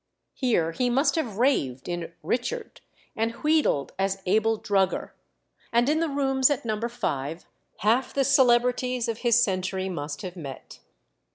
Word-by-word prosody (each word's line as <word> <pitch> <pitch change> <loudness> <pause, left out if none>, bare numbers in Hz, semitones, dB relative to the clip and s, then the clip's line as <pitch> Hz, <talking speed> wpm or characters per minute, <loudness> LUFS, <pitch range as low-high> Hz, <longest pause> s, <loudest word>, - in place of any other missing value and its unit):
Here 220 - +1
he 245 +9 0
must 270 +5 +2
have 245 - -2
raved 140 - +1
in 175 -1 -4
"Richard," 435 - -3 0.3
and 225 +1 -1
wheedled 300 - +2
as 195 0 0
Abel 220 +4 +2
Drugger; 195 -3 0 0.6
and 235 +2 +3
in 310 +1 +2
the 330 -1 0
rooms 270 -1 +2
at 280 -4 -1
No. 215 -2 -1
5 175 - -3 0.4
half 235 +5 +2
the 275 - +1
celebrities 250 -2 +3
of 230 -1 -3
his 240 -1 +4
century 190 -1 -1
must 145 -4 -5
have 180 -1 -6
met. 140 -7 -9
230 Hz, 150 wpm, -26 LUFS, 185-260 Hz, 0.6 s, his